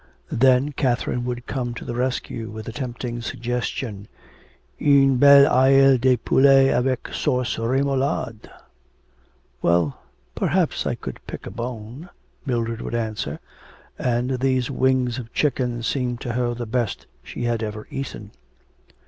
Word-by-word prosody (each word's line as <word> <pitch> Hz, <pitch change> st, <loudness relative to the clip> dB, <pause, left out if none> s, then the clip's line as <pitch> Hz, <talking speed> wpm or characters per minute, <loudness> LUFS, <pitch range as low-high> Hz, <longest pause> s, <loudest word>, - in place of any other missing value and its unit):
Then 130 Hz, +3 st, +3 dB
Catherine 125 Hz, -3 st, -1 dB
would 125 Hz, 0 st, -4 dB
come 120 Hz, -3 st, -3 dB
to -, -, -8 dB
the -, -, -4 dB
rescue 120 Hz, -2 st, -3 dB
with 110 Hz, +1 st, -8 dB
a -, -, -4 dB
tempting 120 Hz, -1 st, -5 dB
suggestion, 120 Hz, -3 st, -4 dB, 0.7 s
Une 135 Hz, -2 st, +5 dB
belle 140 Hz, +1 st, +8 dB
aile 135 Hz, 0 st, +5 dB
de 130 Hz, 0 st, +3 dB
poulet 135 Hz, +3 st, +4 dB
avec 130 Hz, +1 st, -1 dB
sauce 125 Hz, -5 st, -1 dB
remoulade. 130 Hz, -1 st, -1 dB, 1.1 s
'Well, 85 Hz, -4 st, +1 dB, 0.3 s
perhaps -, -, 0 dB
I -, -, -1 dB
could -, -, -8 dB
pick -, -, -7 dB
a -, -, -6 dB
bone,' 120 Hz, +6 st, -7 dB, 0.4 s
Mildred 115 Hz, -2 st, -1 dB
would -, -, -4 dB
answer, 110 Hz, -10 st, -3 dB, 0.6 s
and 125 Hz, +1 st, 0 dB
these 130 Hz, 0 st, +1 dB
wings 130 Hz, -2 st, +1 dB
of 115 Hz, -2 st, -9 dB
chicken 125 Hz, -5 st, 0 dB
seemed 125 Hz, -1 st, -1 dB
to 120 Hz, -, -3 dB
her 120 Hz, 0 st, -1 dB
the 120 Hz, 0 st, -5 dB
best 115 Hz, -3 st, -2 dB, 0.2 s
she -, -, -7 dB
had 120 Hz, -1 st, 0 dB
ever 105 Hz, -1 st, -5 dB
eaten. 110 Hz, -6 st, -6 dB
125 Hz, 135 wpm, -23 LUFS, 115-130 Hz, 1.1 s, belle